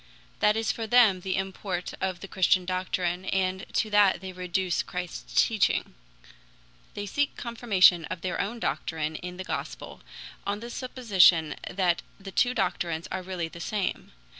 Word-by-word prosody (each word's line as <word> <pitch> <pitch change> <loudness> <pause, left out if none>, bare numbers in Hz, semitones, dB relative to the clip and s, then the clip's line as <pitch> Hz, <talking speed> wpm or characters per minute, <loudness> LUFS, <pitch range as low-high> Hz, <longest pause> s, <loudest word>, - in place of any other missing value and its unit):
That 210 +1 +3
is 225 0 +1
for 225 -1 -5
them 220 -5 +5
the 190 0 -2
import 190 -1 -3
of 185 -2 -2
the 195 - -7
Christian 185 -1 +2
doctrine, 185 0 -2
and 190 0 -1
to 215 - 0
that 205 -3 +5
they 190 0 -7
reduce 180 0 -1
Christ's 170 - -1
teaching. - - +1 1.0
They 205 - -4
seek 285 +8 -1
confirmation 205 -8 +4
of 165 - -6
their 185 -1 -1
own 230 +4 -4
doctrine 160 -6 -2
in 180 0 -7
the 185 - -5
Gospel, - - -6 0.4
on 200 +1 -2
the 235 +2 -8
supposition 195 - +3 0.2
that 180 -2 +1 0.2
the 195 0 -9
two 245 +5 +2
doctrines 175 -4 -1
are 185 - -2
really 180 -2 -4
the 170 - -11
same. 205 +2 -3
185 Hz, 160 wpm, -27 LUFS, 180-205 Hz, 1.0 s, them